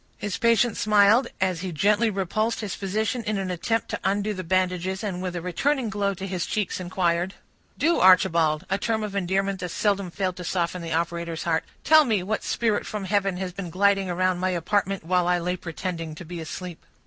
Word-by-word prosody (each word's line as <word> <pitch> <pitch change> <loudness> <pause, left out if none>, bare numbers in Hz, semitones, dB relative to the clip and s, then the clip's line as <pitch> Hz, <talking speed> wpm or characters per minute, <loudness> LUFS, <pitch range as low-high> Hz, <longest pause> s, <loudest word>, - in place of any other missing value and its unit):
His 205 -2 -4
patient 230 0 +3
smiled, 210 +4 +4
as 185 -3 0
he 185 -1 -4
gently 210 +7 +2
repulsed 215 +4 -1
his 210 -4 -4
physician 215 +5 -2
in 215 -1 -1
an 190 -1 -2
attempt 225 +6 -1
to - - -3
undo 205 +2 0
the 185 -2 -5
bandages, 185 +2 0
and 185 -4 -3
with 180 -1 -4
a 170 - -4
returning 245 - 0
glow 200 -2 0
to 190 - -6
his 185 -3 -3
cheeks, 210 -4 -2
inquired,— 180 0 0 0.4
"Do, 335 +3 +2
Archibald,"—a 185 0 +4
term 220 0 -1
of 205 -1 -5
endearment 195 +1 0
that 180 - -4
seldom 200 +1 0
failed 185 0 -2
to 180 - -6
soften 175 0 -1
the 165 -1 -6
operator's 170 0 -2
heart,—"tell 175 - +3
me 215 -9 0
what 215 +4 -2
spirit 225 -3 0
from 210 -2 -4
heaven 195 -1 0
has 185 -1 -4
been 185 -2 -6
gliding 195 +2 +2
around 185 0 +1
my 185 +1 0
apartment, 195 +2 0
while 180 +1 +1
I 180 0 +3
lay 180 +1 -1
pretending 170 -2 -5
to 170 0 -7
sleep?" 180 +1 -7
190 Hz, 195 wpm, -25 LUFS, 175-205 Hz, 0.4 s, smiled